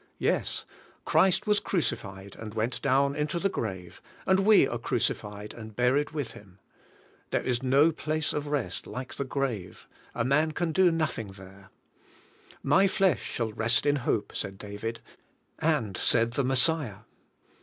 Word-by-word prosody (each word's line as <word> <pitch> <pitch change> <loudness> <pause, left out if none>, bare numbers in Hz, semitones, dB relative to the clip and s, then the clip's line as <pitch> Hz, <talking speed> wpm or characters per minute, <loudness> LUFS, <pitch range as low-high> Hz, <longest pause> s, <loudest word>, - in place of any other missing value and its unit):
Yes. - - 0 0.4
Christ 190 -2 +3
was 210 -1 +3
crucified, 100 - -3
and 110 -1 -7
went 115 +3 -1
down 140 +1 +2
into 150 +3 -1
the 195 +3 +1
grave, 95 - -5 0.2
and 190 0 +4
we 200 -7 +6
are 120 - -4
crucified 105 -3 -2
and 110 -2 -10
buried 130 +5 +2
with 145 -6 -4
Him. 95 -3 -15 0.7
There - - 0
is 125 -2 0
no 140 +5 +4
place 155 0 -2
of 150 0 -3
rest 135 -12 -2
like 125 +1 -6
the - - -3
grave; 125 -9 -4 0.3
a 115 - 0
man 150 +4 +2
can 170 0 -1
do 185 +1 +4
nothing 145 -11 -2
there, 95 0 -14 1.0
'^My 190 +8 +5
flesh 185 -9 +2
shall 115 -2 -3
rest 115 +2 +1
in 145 0 +3
hope," 125 -5 -1
said 95 -1 -3
David, 105 +3 -6 0.6
and 140 - 0
said 115 +3 +3
the 135 +3 0
Messiah. 130 - +2
130 Hz, 155 wpm, -28 LUFS, 110-155 Hz, 1.0 s, we